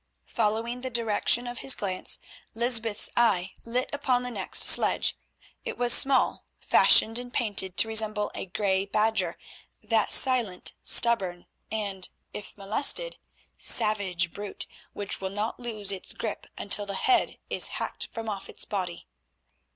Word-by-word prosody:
Following 230 +2 -1
the 260 - -4
direction 235 0 +1
of 245 -1 -5
his 270 - +4
glance, 185 -2 -2 0.4
Lysbeth's 225 -2 0
eye 195 -6 +2
lit 245 +3 -1
upon 255 -3 0
the 250 - -5
next - - 0
sledge. - - +5 0.5
It - - -5
was 240 -1 +4
small, 270 -1 +2 0.2
fashioned 225 +2 +5
and 245 0 -8
painted 205 -7 -1
to - - +3
resemble 215 -1 +2
a - - -6
grey 190 0 0
badger, 220 +2 0 0.5
that 225 -2 +1
silent, 240 -9 +2
stubborn, 190 -7 +3 0.3
and, 200 -4 -3 0.2
if 210 - -8
molested, 250 - +1 0.4
savage 185 -5 0
brute, 205 -1 -6 0.3
which 200 -1 -2
will 190 - -2
not 210 +3 -3
loose 215 -5 -3
its 190 -2 -5
grip - - -5
until 205 0 -1
the 200 - -3
head 375 - +1
is - - 0
hacked - - -4
from 225 -1 -7
off 200 -3 -5
its - - -4
body. 185 -4 -4
215 Hz, 145 wpm, -27 LUFS, 195-240 Hz, 0.5 s, sledge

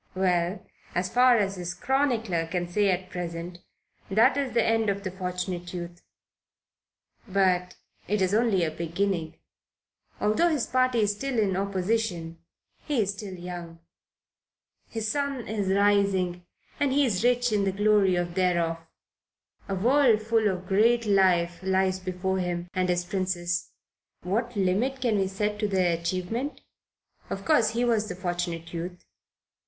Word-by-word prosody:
Well, 180 0 0 0.3
as 180 +1 -1
far 250 0 +6
as 195 -2 0
his 175 -1 -4
chronicler 230 - 0
can 175 +1 -2
say 200 +3 +1
at 185 0 -1
present, 175 0 -5 0.5
that 220 +5 +4
is 275 -4 -2
the 235 - +4
end 225 -1 +2
of 200 0 -2
the 190 - -3
Fortunate 180 -1 -4
Youth. 175 0 -7 1.3
But 185 -2 +1 0.3
it 210 +1 0
is 190 0 +1
really 225 +3 +4
only 195 -6 +2
a 155 - -2
beginning. 170 0 -2 0.8
Although 215 +11 +2
his 300 -7 0
party 255 -2 +2
is 210 -1 +2
still 270 +3 -3
in 200 -4 +2
opposition, 190 -3 -1 0.4
he 290 -5 -1
is 200 - -1
still 200 -2 -7
young; 175 -1 -7 1.1
his 220 -1 -3
sun 280 -1 -2
is 205 -3 -2
rising 195 -3 +2 0.3
and 285 -2 +2
he 280 +1 +3
is 205 -5 0
rich 245 0 +2
in 205 -2 +2
the 195 - +1
glory 205 -1 +3
thereof. 175 -1 0 0.9
A 195 - 0
worldful 225 -1 +3
of 185 0 -5
great 230 +4 +3
life 180 -4 +3
lies 190 0 +1
before 190 +1 -2
him 175 -1 -3
and 185 0 0
his 175 0 0
Princess. 175 -2 -2 0.5
What 230 +7 -1
limit 205 +8 +1
can 235 -5 +1
we 190 - +1
set 210 +2 -2
to 210 - +1
their 185 -4 +2
achievement? 185 - -3 0.7
Of - - -5
course 300 -9 +4
he 240 +1 +1
was 220 -3 +1
the 180 - -4
Fortunate 175 -2 -4
Youth. 175 +1 -6
190 Hz, 150 wpm, -27 LUFS, 180-220 Hz, 1.3 s, far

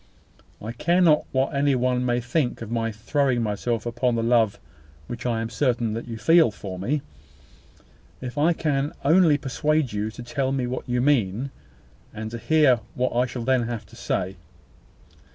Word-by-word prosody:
I 110 - -6
care 170 +9 +1
not 160 -4 +4
what 130 0 0
any 140 0 +2
one 125 0 +1
may 120 0 +1
think 120 0 -1
of 115 - -8
my 115 -1 -1
throwing 125 +3 0
myself 110 +2 -2
upon 120 +1 0
the 115 - 0
love 115 -3 +2 0.5
which 120 +5 -5
I 115 -2 0
am 115 - -3
certain 120 -3 0
you 115 -1 -5
feel 165 +4 +5
for 95 -3 -7
me, 135 +9 -1 1.2
if 125 0 -6
I 150 +4 +3
can 145 -3 -1
only 160 -1 +5
persuade 150 -1 0
you 105 +1 -1
to 120 +2 -9
tell 130 +2 -1
me 135 -2 0
what 125 +1 -5
you 125 0 +1
mean, 130 -2 +1 0.6
and 110 +1 -5
to 115 - -5
hear 145 -3 +4 0.2
what 125 -1 -1
I 125 +1 +2
shall 120 -1 -5
then 125 -1 +2
have 120 -3 -5
to - - -17
say. 95 +1 -2
125 Hz, 175 wpm, -24 LUFS, 115-140 Hz, 1.2 s, feel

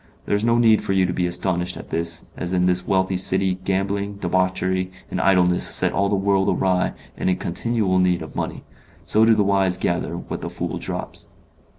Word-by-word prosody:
There - - -2
is 105 - -1
no 115 0 +3
need 115 -2 +4
for 95 - -2
you 95 -1 +3
to 90 - -2
be 90 0 0
astonished 90 0 -1
at - - -11
that, 85 0 -1
as 90 +1 -4
in 90 -1 +2
this 90 0 +1
wealthy 95 0 +1
city 95 0 +2
gambling, 100 +1 -1
debauchery, 95 0 -1 0.2
and - - -1
idleness 90 -2 +3
set - - +2
all 100 +1 +1
the 100 - +1
world 100 0 +1
awry 90 -1 +1 0.2
and - - -1
in 90 - +2
continual 95 +1 -1
need 90 -2 +1
of 80 - -11
money; - - -4 0.4
so 110 +1 +3
do 115 0 +5
the 105 - +2
wise 95 -2 +1
gather 85 -1 -2
what - - -6
the - - -4
fool - - -4
drops. - - -6
95 Hz, 205 wpm, -22 LUFS, 90-100 Hz, 0.4 s, do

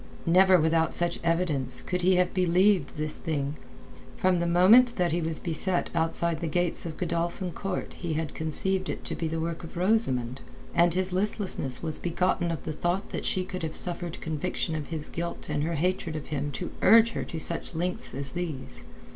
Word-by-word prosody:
Never 185 +2 +6
without 160 +1 +2
such 175 0 0
evidence 165 -7 0
could 180 0 -1
he 185 +1 +4
have 180 0 +2
believed 185 -2 +3
this 155 0 -3
thing. 145 -2 -2 0.6
From 185 -1 +2
the 170 - 0
moment 220 +8 +6
that 180 -2 +1
he 170 +2 0
was 160 -1 -2
beset 175 +2 -1
outside 165 0 0
the 170 - -1
gates 175 +2 -1
of 160 - -7
Godolphin 170 +1 -2
Court 195 +1 -4
he 170 -3 -4
had 160 -1 -3
conceived 185 +4 0
it - - -5
to - - 0
be 165 - -2
the 160 +1 -2
work 165 +1 -3
of 165 - -9
Rosamund, 135 - +1 0.3
and 170 0 +4
his 185 0 +1
listlessness 185 - 0
was 160 -2 -2
begotten 175 0 0
of 165 -4 -3
the 155 - -4
thought 175 +5 -2
that - - -4
she 185 -2 0
could 185 0 -6
have 160 -1 -4
suffered 175 -1 -1
conviction 160 +1 -2
of 155 -2 -3
his 160 -3 -3
guilt 170 -1 -5
and 150 -1 0
her 165 +2 -1
hatred 170 0 -1
of 155 - -5
him 145 0 -2
to 180 - -5
urge 230 +1 +7
her - - -3
to 165 - -6
such 170 +2 -3
lengths 180 -3 -3
as 135 -1 -3
these. 140 - -5
170 Hz, 195 wpm, -27 LUFS, 160-180 Hz, 0.6 s, urge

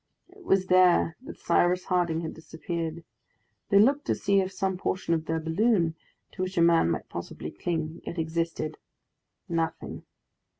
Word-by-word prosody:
It 380 +1 -17
was 195 - +2
there 180 -3 +4
that 290 - -10
Cyrus 180 +1 +2
Harding 175 -3 +1
had 160 - -5
disappeared. 165 0 -5 0.7
They 200 - +5
looked 275 +8 +4
to - - +1
see 200 -1 +2
if 190 0 -1
some 190 -1 -1
portion 180 -1 -1
of 160 -1 -1
their 160 0 -1
balloon, 170 +1 +2 0.4
to 185 - -7
which 185 +1 -3
a - - +4
man 170 - +4
might 80 -3 -2
possibly - - -6
cling, 160 -1 -3
yet 170 - -6
existed. 160 -1 -2 0.7
Nothing! 165 -1 -3
170 Hz, 160 wpm, -27 LUFS, 160-190 Hz, 0.7 s, They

